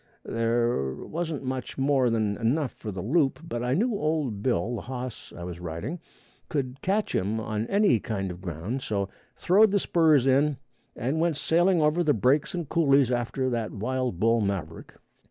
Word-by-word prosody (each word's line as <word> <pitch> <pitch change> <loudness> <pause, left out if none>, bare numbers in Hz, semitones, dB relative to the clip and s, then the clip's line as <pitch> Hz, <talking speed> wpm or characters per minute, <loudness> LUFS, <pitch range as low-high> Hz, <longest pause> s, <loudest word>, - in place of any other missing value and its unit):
There 115 - 0
wasn't 160 -3 -4
much 130 -1 -4
more 135 -2 +3
than 110 -3 0
enough 125 +4 0
for 110 - -7
the 95 -2 -5
loop. 135 +4 +2
But 120 -7 -3
I 125 +2 +1
knew 235 +9 +1
old 150 - -1
Bill, 120 0 0
the - - -5
hoss 125 -2 -6
I 85 - -7
was 85 -1 -6
riding, 90 - -5 0.5
could 135 -2 -3
catch 205 +3 0
him 105 +4 0
on 110 0 -3
any 200 - +3
kind 95 -3 -3
of 90 +1 -9
ground, 95 - -4
so 100 -4 -2 0.3
throwed 210 +5 +4
the 200 - +2
spurs 160 -8 +3
in 140 +2 +3 0.4
and 135 +6 -1
went 165 -3 +1
sailing 170 +2 +3
over 155 +4 +2
the 150 -4 +3
breaks 135 - +2
and 170 -4 -3
coolies 140 -5 +3
after 125 +2 -1
that 115 -3 -2
wild 125 -2 -2
bull 115 +2 +3
maverick. 95 -6 -4
125 Hz, 175 wpm, -27 LUFS, 110-155 Hz, 0.5 s, throwed